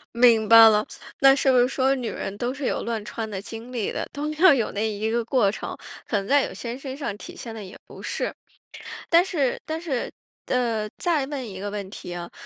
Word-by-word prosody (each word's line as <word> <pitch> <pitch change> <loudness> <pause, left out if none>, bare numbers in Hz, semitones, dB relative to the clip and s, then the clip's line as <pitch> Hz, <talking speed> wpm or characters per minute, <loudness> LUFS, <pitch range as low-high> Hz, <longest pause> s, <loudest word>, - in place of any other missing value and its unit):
明 235 -3 +5
白 225 0 +10
了。 210 0 +2 0.3
那 270 0 +7
是 270 -1 +3
不 255 - +4
是 245 0 +5
说 265 0 +1
女 250 -3 -3
人 195 - -5
都 245 +3 -2
是 275 -1 -5
有 - - -1
乱 230 -2 -3
穿 220 +1 -5
的 195 -3 -5
经 225 +4 -8
历 230 -5 -2
的？ - - -4
都 300 +2 -3
要 350 +1 +7
有 240 -5 0
那 210 +2 -1
一 215 +1 -2
个 235 +1 0
过 235 -5 +2
程。 - - -6 0.3
可 - - -2
能 195 0 -3
在 285 +2 +4
有 - - -5
些 235 0 -6
身 270 -1 -7
上 275 -8 -4
体 - - -10
现 230 - -7
的 220 -2 -7
也 185 - -11
不 - - -12
是 - - -3 0.8
但 340 +1 +6
是 295 -9 0
但 315 +1 -3
是 290 -8 -3 0.4
呃， 230 -4 0
再 320 -6 +1
问 270 -3 -5
一 190 -2 -8
个 205 - -4
问 200 -2 -5
题 175 -3 -8
啊。 175 0 -6
235 Hz, 250 characters per minute, -24 LUFS, 215-270 Hz, 0.8 s, 白